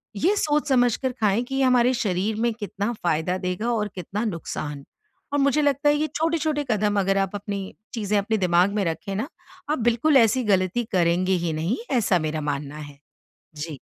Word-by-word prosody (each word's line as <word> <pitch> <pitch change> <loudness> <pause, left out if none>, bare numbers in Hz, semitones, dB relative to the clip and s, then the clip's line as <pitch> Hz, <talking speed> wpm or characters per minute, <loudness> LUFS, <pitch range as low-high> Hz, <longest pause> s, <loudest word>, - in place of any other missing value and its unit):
ये 365 - +2
सोच 300 -2 +1
समझकर 250 0 +2
खाएँ 210 +3 +2
कि 270 +2 -5
ये 270 - +2
हमारे 250 -1 +4
शरीर 210 -2 -1
में 235 -1 +1
कितना 205 0 -3
फ़ायदा 175 +2 0
देगा 185 +6 -2
और 210 -2 0
कितना 190 +5 -4
नुकसान। 155 -7 -5 0.5
और 285 - +2
मुझे 280 +2 +3
लगता 285 0 +2
है 295 - +4
कि 295 - -1
ये 310 - +1
छोटे-छोटे 315 -2 0
कदम 205 -1 +1
अगर 195 0 +1
आप 195 +1 -1
अपनी 200 -1 -5 0.2
चीज़ें 210 -3 0
अपने 220 +2 0
दिमाग 180 +1 +3
में 205 - +1
रखें 165 +4 -3
ना, 215 +7 -2 0.4
आप 305 - 0
बिल्कुल 240 +6 +3
ऐसी 240 +1 +4
गलती 195 +2 +1
करेंगे 180 +1 +2
ही 170 -2 0
नहीं, 165 +10 -1
ऐसा 210 -8 +2
मेरा 155 0 -2
मानना 145 0 -3
है। 145 -2 -10 0.6
जी। 150 -1 -6
205 Hz, 190 wpm, -24 LUFS, 180-250 Hz, 0.6 s, हमारे